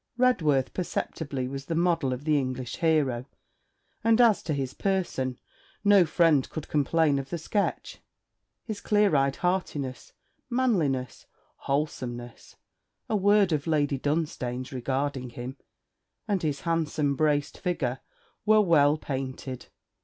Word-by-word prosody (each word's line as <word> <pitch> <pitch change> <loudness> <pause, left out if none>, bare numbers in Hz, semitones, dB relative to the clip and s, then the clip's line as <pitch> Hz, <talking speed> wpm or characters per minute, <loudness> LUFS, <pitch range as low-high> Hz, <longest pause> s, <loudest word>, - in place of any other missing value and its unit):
Redworth 160 - +2
perceptibly 145 -6 -3
was 135 +1 -6
the 165 - -2
model 165 -5 +1
of 125 +2 -4
the 155 0 +2
English 130 -3 -2
hero; 140 -7 +1 0.8
and 225 +1 +4
as 230 -4 +5
to 155 - -2
his 135 -2 -3
person, 175 -10 -1 0.5
no 200 -4 +6
friend 155 -4 +3
could 155 - -6
complain 150 0 +2
of 135 0 -7
the 170 - -3
sketch; 200 +5 -2 0.6
his 215 -3 -6
clear 205 -5 +3
eyed 135 0 +2
heartiness, 150 -8 -2 0.4
manliness, 170 - 0 0.3
wholesomeness 125 -4 -4 0.5
a 220 - +1
word 205 -1 +4
of 150 0 -1
Lady 145 -3 +1
Dunstane's 130 -4 -2
regarding 130 0 -2
him, 125 +3 -7 0.7
and 200 -4 0
his 150 -3 -2
handsome 155 -4 0
braced 145 -1 0
figure, 135 -9 -1 0.4
were 215 0 +5
well 155 -5 +4
painted. 130 -2 -5
150 Hz, 125 wpm, -27 LUFS, 135-175 Hz, 0.8 s, no